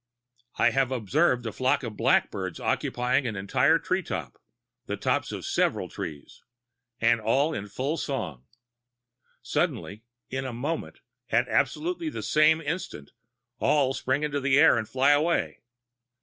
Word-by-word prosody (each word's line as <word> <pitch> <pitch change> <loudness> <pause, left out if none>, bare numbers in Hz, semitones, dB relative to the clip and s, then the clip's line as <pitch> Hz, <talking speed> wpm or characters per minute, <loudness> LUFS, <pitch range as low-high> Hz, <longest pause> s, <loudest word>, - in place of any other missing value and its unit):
I - - +4
have 135 -1 +1
observed 125 - +1
a 110 - -2
flock 130 +5 +1
of 115 -3 -5
blackbirds 95 -4 +1
occupying 125 +2 0
an 110 - -3
entire 95 0 +3
treetop - - -3 0.5
the - - -3
tops - - 0
of - - -6
several - - 0
trees 75 -3 -8 0.6
and 115 0 +3
all 135 +8 +2
in 105 -6 -5
full 135 +10 -2
song. 70 - -4 1.0
Suddenly 105 +3 -2 0.3
in 130 +1 -2
a 130 -2 -5
moment 140 +8 -4 0.3
at - - +2
absolutely 335 0 0
the - - -6
same 155 +1 +4
instant 150 - -5 0.5
all 140 -3 +2
spring 135 +2 -1
into 145 -1 -1
the 135 0 +2
air - - +7
and 110 -2 -2
fly 135 +2 +3
away. 155 +4 +1
130 Hz, 140 wpm, -27 LUFS, 115-150 Hz, 1.0 s, air